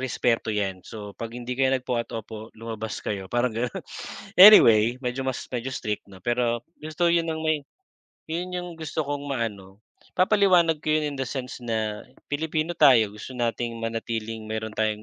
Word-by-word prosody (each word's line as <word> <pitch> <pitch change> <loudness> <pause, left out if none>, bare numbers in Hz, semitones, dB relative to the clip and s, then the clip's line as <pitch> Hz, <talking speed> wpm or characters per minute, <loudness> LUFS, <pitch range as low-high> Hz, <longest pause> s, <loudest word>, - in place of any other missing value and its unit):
respeto 120 -3 0
'yan, 95 -3 -2
so 105 -2 -8
'pag 115 0 -5
hindi 125 +1 -4
kayo 135 0 +3
nag-po 125 -1 -2
at 115 - -8
opo, 110 0 -7
lumabas 110 -1 -5
kayo, 95 -2 -3
parang 120 0 +1
gano'n. 120 +2 -2 0.6
Anyway, 120 - +9
medyo 125 +2 -2
mas, 130 - -3
medyo 125 +1 -3
strict 105 -1 -3
na, 95 - -12
pero 120 -1 0 0.2
gusto 155 +3 -1
'yon 170 -1 +2
ng 160 0 -3
may 155 -2 +1 0.7
'yon 175 +3 -3
'yong 180 0 -4
gusto 160 0 -3
kong 145 0 -3
maano 100 -7 -4 0.4
papaliwanag 185 -5 +4
ko - - -4
'yon 150 -2 0
in - - -7
the - - 0
sense 130 -1 -5
na 110 -2 -2 0.3
Pilipino 155 +2 -1
tayo 120 -9 +5
gusto 105 +5 -9
nating 120 -1 -2
manatiling 115 -1 -4
mayroon 110 0 -4
tayong 110 -1 -1
120 Hz, 170 wpm, -25 LUFS, 110-150 Hz, 0.7 s, Anyway